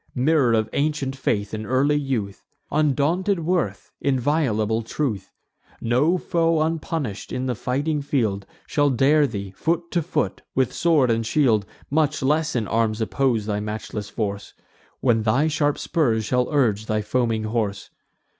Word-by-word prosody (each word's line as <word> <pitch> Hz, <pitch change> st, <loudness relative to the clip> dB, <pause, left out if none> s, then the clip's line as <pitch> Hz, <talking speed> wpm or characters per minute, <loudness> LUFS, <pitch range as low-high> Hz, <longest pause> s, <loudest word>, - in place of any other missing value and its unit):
Mirror 135 Hz, -2 st, +3 dB
of 110 Hz, -1 st, +1 dB
ancient 145 Hz, -2 st, -1 dB
faith 105 Hz, -6 st, -1 dB
in 110 Hz, 0 st, -3 dB
early 135 Hz, +4 st, +2 dB
youth! 125 Hz, -9 st, -2 dB, 0.3 s
Undaunted 155 Hz, +6 st, +1 dB
worth, 175 Hz, +1 st, -1 dB
inviolable 125 Hz, -5 st, +1 dB
truth! 115 Hz, -3 st, -3 dB, 0.5 s
No 135 Hz, +10 st, +2 dB
foe, 165 Hz, -2 st, +1 dB
unpunish'd, 160 Hz, -, -3 dB
in 125 Hz, +1 st, -2 dB
the 125 Hz, -, 0 dB
fighting 140 Hz, +6 st, -1 dB
field 110 Hz, -9 st, -1 dB, 0.2 s
Shall 145 Hz, -1 st, +2 dB
dare 140 Hz, +3 st, +4 dB
thee, 100 Hz, -5 st, -5 dB
foot 170 Hz, -, -2 dB
to 175 Hz, -, +1 dB
foot, 165 Hz, -, -2 dB
with 130 Hz, -2 st, +1 dB
sword 150 Hz, -8 st, +3 dB
and 115 Hz, 0 st, +1 dB
shield; 115 Hz, -5 st, +2 dB, 0.2 s
Much 150 Hz, -1 st, +1 dB
less 150 Hz, +2 st, +1 dB
in 115 Hz, -4 st, 0 dB
arms 110 Hz, 0 st, 0 dB
oppose 115 Hz, -1 st, 0 dB
thy 105 Hz, -1 st, -1 dB
matchless 105 Hz, 0 st, -5 dB
force, 100 Hz, -2 st, -4 dB, 0.5 s
When 115 Hz, -3 st, +3 dB
thy 120 Hz, +8 st, +2 dB
sharp 145 Hz, -1 st, +1 dB
spurs 115 Hz, -9 st, 0 dB
shall 125 Hz, +4 st, 0 dB
urge 110 Hz, -8 st, +1 dB
thy 110 Hz, -1 st, 0 dB
foaming 115 Hz, 0 st, 0 dB
horse. 110 Hz, -2 st, -2 dB
130 Hz, 145 wpm, -23 LUFS, 110-150 Hz, 0.5 s, dare